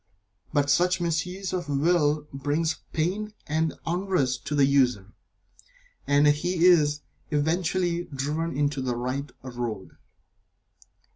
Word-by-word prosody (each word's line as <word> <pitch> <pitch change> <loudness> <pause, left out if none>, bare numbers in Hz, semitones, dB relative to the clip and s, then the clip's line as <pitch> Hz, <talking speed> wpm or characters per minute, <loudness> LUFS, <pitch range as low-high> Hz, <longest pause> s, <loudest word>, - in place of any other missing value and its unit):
But 145 -2 +2
such 180 +5 +3
misuse 175 +3 -2
of 180 -3 -2
the 145 - -1
Will 150 -1 +2
brings 150 +4 -1
pain 200 +7 -2
and 160 0 0
unrest 165 -8 -1
to 150 - -1
the 140 -1 +5
user, 125 -8 +2 0.9
and 145 +1 +4
he 165 +4 +2
is 150 -5 +5 0.3
eventually 170 +3 0
driven 150 +2 -3
into 145 -1 0
the 125 -2 -1
right 130 +4 -3
road. 120 -6 -5
150 Hz, 120 wpm, -26 LUFS, 140-175 Hz, 0.9 s, the